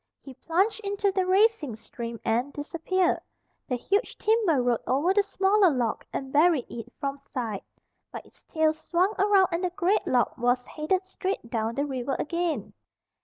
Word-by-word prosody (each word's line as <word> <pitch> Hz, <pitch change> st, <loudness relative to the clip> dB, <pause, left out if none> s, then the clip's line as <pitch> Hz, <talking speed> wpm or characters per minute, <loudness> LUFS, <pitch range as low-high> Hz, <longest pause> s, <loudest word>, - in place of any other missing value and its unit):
He 270 Hz, -, -11 dB
plunged 375 Hz, -, 0 dB
into 400 Hz, 0 st, 0 dB
the 375 Hz, -1 st, 0 dB
racing 380 Hz, -, +3 dB
stream 230 Hz, +1 st, -7 dB
and 240 Hz, +5 st, +1 dB
disappeared. 335 Hz, +5 st, 0 dB, 0.5 s
The 250 Hz, -, 0 dB
huge 400 Hz, -, -1 dB
timber 430 Hz, -, +2 dB
rode 245 Hz, -2 st, +1 dB
over 290 Hz, +9 st, +2 dB
the 410 Hz, -, +4 dB
smaller 395 Hz, 0 st, +3 dB
log 245 Hz, -7 st, -1 dB
and 265 Hz, -1 st, -5 dB
buried 305 Hz, -3 st, +4 dB
it 235 Hz, +1 st, -7 dB
from 280 Hz, 0 st, -3 dB
sight. 235 Hz, -7 st, -5 dB, 0.5 s
But -, -, -8 dB
its -, -, -22 dB
tail 315 Hz, -1 st, +2 dB
swung 355 Hz, +5 st, 0 dB
around 390 Hz, -2 st, +4 dB
and 340 Hz, +2 st, -1 dB
the 365 Hz, -, +1 dB
great 370 Hz, +3 st, 0 dB
log 250 Hz, -1 st, +2 dB
was 245 Hz, +1 st, +1 dB
headed 365 Hz, +5 st, -1 dB
straight 375 Hz, -, -4 dB
down 225 Hz, 0 st, -1 dB
the 280 Hz, +2 st, 0 dB
river 265 Hz, -1 st, -2 dB
again. 305 Hz, -, -2 dB
315 Hz, 170 wpm, -27 LUFS, 250-380 Hz, 0.5 s, the